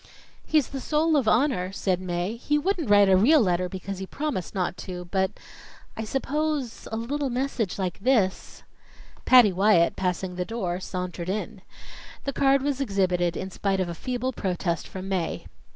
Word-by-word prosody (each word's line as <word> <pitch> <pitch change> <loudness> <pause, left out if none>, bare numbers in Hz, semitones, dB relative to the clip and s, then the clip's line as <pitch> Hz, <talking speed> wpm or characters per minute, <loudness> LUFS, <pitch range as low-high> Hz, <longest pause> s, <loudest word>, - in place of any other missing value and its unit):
"He's 305 -4 +2
the 275 - -5
soul 310 +3 +2
of 270 -6 +2
honor," 230 -8 +2
said 185 -2 -1
Mae. 180 +3 -2
"He 295 +5 0
wouldn't 330 - -1
write 205 -1 +6
a 190 - +5
real 265 +12 +6
letter 180 -5 +1
because 190 0 -6
he 190 - -5
promised 280 - -4
not 180 -2 -1
to, 180 -1 -7
but 190 -1 +2 0.7
I 220 - -4
suppose 280 0 -2
a 220 - -2
little 275 +5 -2
message 245 -5 -2
like 185 -3 -3
this 210 -5 0 0.3
" - - -23
Patty 245 -6 +7
Wyatt 185 -2 +4
passing 180 0 -2
the 180 - 0
door, 185 -4 -3
sauntered 180 -2 -5
in. 205 0 -4 0.6
The 275 - -3
card 275 0 +3
was 280 -1 -1
exhibited 185 -7 +1
in 190 0 -5
spite 195 +1 -1
of 185 -2 -1
a - - -3
feeble 255 +6 -3
protest 175 -5 -2
from 190 0 -7
Mae. 185 -4 -2
200 Hz, 175 wpm, -26 LUFS, 185-265 Hz, 0.7 s, Patty